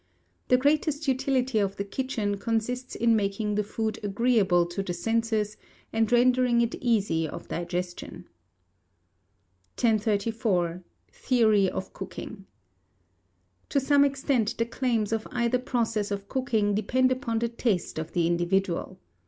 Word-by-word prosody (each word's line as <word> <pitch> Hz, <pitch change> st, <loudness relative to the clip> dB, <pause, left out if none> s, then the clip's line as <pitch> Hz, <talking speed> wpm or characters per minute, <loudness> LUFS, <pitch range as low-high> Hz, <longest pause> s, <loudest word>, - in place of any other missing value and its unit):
The 250 Hz, -, +5 dB
greatest 295 Hz, +2 st, +1 dB
utility 260 Hz, -2 st, +1 dB
of 200 Hz, -1 st, 0 dB
the 200 Hz, -, -3 dB
kitchen 205 Hz, -2 st, -2 dB
consists 240 Hz, +3 st, -2 dB
in 230 Hz, 0 st, +3 dB
making 210 Hz, 0 st, -1 dB
the 210 Hz, +1 st, +1 dB
food 220 Hz, +1 st, -3 dB
agreeable 205 Hz, -4 st, +2 dB
to 175 Hz, +3 st, -4 dB
the 180 Hz, -2 st, -4 dB
senses, 220 Hz, +2 st, -1 dB, 0.4 s
and 225 Hz, 0 st, +1 dB
rendering 245 Hz, 0 st, +4 dB
it 235 Hz, 0 st, 0 dB
easy 205 Hz, -9 st, +1 dB
of -, -, -8 dB
digestion." 175 Hz, +1 st, -4 dB, 1.5 s
1034. 210 Hz, -5 st, +1 dB, 0.3 s
Theory 215 Hz, -6 st, +3 dB
of 190 Hz, -, -5 dB
Cooking. 195 Hz, +1 st, -8 dB, 1.2 s
To 280 Hz, -, +2 dB
some 285 Hz, +1 st, +4 dB
extent 270 Hz, -5 st, 0 dB
the 230 Hz, -, +1 dB
claims 230 Hz, -3 st, -1 dB
of 225 Hz, 0 st, -2 dB
either 240 Hz, +1 st, +1 dB
process 230 Hz, -4 st, -1 dB
of 200 Hz, -1 st, -4 dB
cooking 220 Hz, -5 st, 0 dB
depend 255 Hz, +5 st, +2 dB
upon 255 Hz, -3 st, -1 dB
the 235 Hz, +1 st, 0 dB
taste 220 Hz, -9 st, -1 dB
of 160 Hz, -, -6 dB
the 170 Hz, -1 st, +2 dB
individual. 175 Hz, +2 st, 0 dB
220 Hz, 130 wpm, -27 LUFS, 200-245 Hz, 1.5 s, The